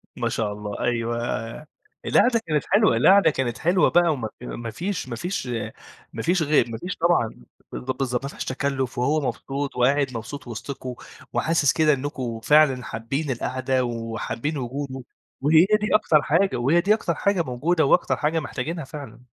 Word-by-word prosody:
ما - - -1
شاء 105 -2 -2
الله، 105 0 -6
أيوه. 120 -1 -1 0.7
القعدة 235 -2 +4
كانت 155 -2 0
حلوة، 210 +2 +4
القعدة 195 -4 +6
كانت 125 -4 -2
حلوة 175 +2 +3
بقى 175 -1 +4
وما 120 -6 -3
ف - - -9
ما 115 -2 -5
فيش 180 - -4
ما 120 - -4
فيش 180 - -3 0.7
ما - - -5
فيش 175 0 +2
غير 145 -6 +2
ما 115 - -5
فيش 180 +6 -5
طبعًا 160 - +1 0.3
بالض 130 - -5
بالضبط. 125 -1 -1
ما - - -2
فيهاش - - -6
تَكلُّف، 130 -2 -2
وهو 145 +5 +2
مبسوط، 140 0 -4
وقاعد 140 +3 +3
مبسوط 125 +5 -7
وِسطكم، 125 +2 -6 0.4
وحاسس 160 -3 +2
كده 155 -1 +3
إنّكم 130 -4 -3
فعلًا 140 -3 +4
حابّين 135 +7 -3
القعدة 130 +1 -1
وحابّين 115 +5 -3
وجوده، 130 +1 -5 0.4
وهي 155 +4 +5 0.2
دي 215 - 0
أكتر 160 -8 +4
حاجة، 185 +6 +2
وهي 140 +8 +3
دي 205 +4 +3
أكتر 175 -6 -2
حاجة 195 +2 +1
موجودة 155 +4 0
وأكتر 160 - +3
حاجة 160 +2 0
محتاجينها 150 +3 -4
فعلًا. 135 -5 -9
140 Hz, 170 wpm, -24 LUFS, 120-160 Hz, 0.7 s, القعدة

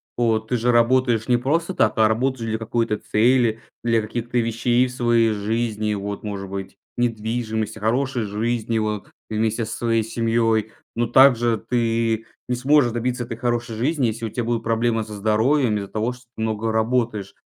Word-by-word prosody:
Вот 110 -2 +1
ты 125 - +1
же 120 +2 +2
работаешь 120 -1 +3
не 125 - +4
просто 165 +9 0
так, - - +1
а 110 -1 +5
работаешь 115 +1 -1
для 110 - -1
какой-то 115 -1 -1
цели, 115 +1 +2 0.2
для 115 -1 +2
каких-то 120 +3 -4
вещей 120 +2 +2
в - - -8
своей 120 -2 +2
жизни 110 0 -1
вот, 100 0 -5
может 100 -2 -5
быть, 95 0 -6 0.2
недвижимость, 110 -2 -2
о - - -9
хорошей 125 +3 0
жизнью, 110 +2 -1
вот, 105 -1 -4 0.2
вместе 110 +1 0
со - - -5
своей 115 -1 +1
семьей. 115 -1 0 0.2
Но 120 0 0
также 120 -2 +5
ты 115 -2 0 0.2
не 125 - 0
сможешь 130 0 +3
добиться 120 +1 -2
этой 115 -1 -6
хорошей 120 -1 -2
жизни, 135 +3 +1
если 115 +1 -3
у - - -3
тя 120 +3 -3
будут 115 0 -1
проблемы 115 0 +1
со 105 0 -9
здоровьем 110 +4 +2
из-за 100 -1 -4
того, 110 +4 -2
что 125 0 -16
ты 110 - -2
много 110 0 -1
работаешь. 110 -3 0
115 Hz, 180 wpm, -22 LUFS, 110-120 Hz, 0.2 s, а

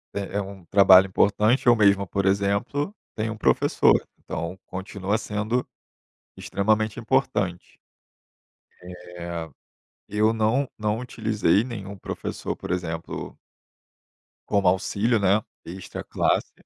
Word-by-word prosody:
é 100 0 -4
é - - +1
um 95 -2 -9
trabalho 95 0 +7
importante, 105 +6 +2
eu 120 - +7
mesmo, 100 -2 +4
por 100 -1 -1
exemplo, 100 - 0 0.2
tenho 110 +1 -2
um - - -11
professor, - - +3 0.3
então 85 +3 -5
continua 95 +2 -3
sendo 110 +2 -2 0.7
extremamente 110 +2 0
importante. 110 -8 -1 1.4
Eh, 85 -2 -5 0.6
eu 110 +1 +2
não 115 +5 +1
não 105 +1 -1
utilizei 110 -5 +1
nenhum 100 -5 -7
professor, - - -5
por - - -8
exemplo 80 -2 -4 1.1
como 100 -2 +2
auxílio, 100 +5 +1
né, 100 +2 +3 0.2
extra 95 +2 -7
classe - - 0
100 Hz, 110 wpm, -24 LUFS, 95-110 Hz, 1.4 s, trabalho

